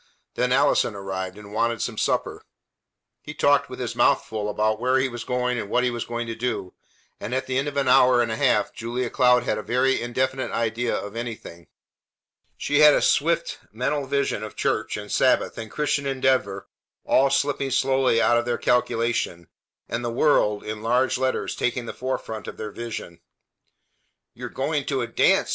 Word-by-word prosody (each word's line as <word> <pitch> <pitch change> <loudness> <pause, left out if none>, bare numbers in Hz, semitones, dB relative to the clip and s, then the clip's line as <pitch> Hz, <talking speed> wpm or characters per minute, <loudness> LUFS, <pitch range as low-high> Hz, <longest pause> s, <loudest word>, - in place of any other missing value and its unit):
Then - - 0
Allison - - +3
arrived, 95 -1 -5
and 105 -1 -12
wanted 115 +1 0
some - - -3
supper. - - -1 0.8
He - - -9
talked - - +3
with - - -8
his - - -4
mouth - - +3
full 105 -1 -4
about 110 +1 0
where 130 +2 +2
he 130 0 +2
was 120 -2 -6
going 125 -1 -1
and 100 - -5
what 125 - +2
he 125 - +1
was 120 -1 -4
going 120 0 -4
to 115 - -4
do, 115 -5 -3 0.5
and 125 - -4
at 130 - -1
the 130 - -3
end 140 - -2
of 145 - -4
an 140 - +1
hour 125 -1 +5
and 120 -2 +1
a - - -1
half - - +1
Julia 120 +1 -3
Cloud 125 -2 +4
had 105 - -1
a - - -3
very 125 +3 +1
indefinite 130 +2 -1
idea 115 +1 -1
of 105 +2 -5
anything. 115 -8 -7 0.9
She 145 0 0
had 150 -1 +8
a - - +2
swift 170 +3 +1
mental 135 +5 -2
vision 140 -6 0
of 110 -1 -7
church 110 0 -1
and 105 0 -8
Sabbath - - +2
and 110 -1 -6
Christian 140 +3 -1
Endeavor 130 -7 0 0.4
all 135 +1 +4
slipping 140 0 0
slowly 130 -2 +2
out 120 +1 +4
of 120 - -3
their 120 -1 -1
calculation, 115 -8 0 0.4
and 120 - -3
the 120 - -1
WORLD 115 -5 +2
in 105 0 -6
large 125 +3 +1
letters 130 0 -1
taking 125 0 -1
the - - -6
forefront 120 -4 -4
of - - -8
their 105 -1 -6
vision. 115 -7 -7 1.1
"You - - -7
are - - -10
going 145 +1 -2
to 135 -3 0
a 120 - -2
dance!" 115 - +2
120 Hz, 195 wpm, -24 LUFS, 110-130 Hz, 1.1 s, had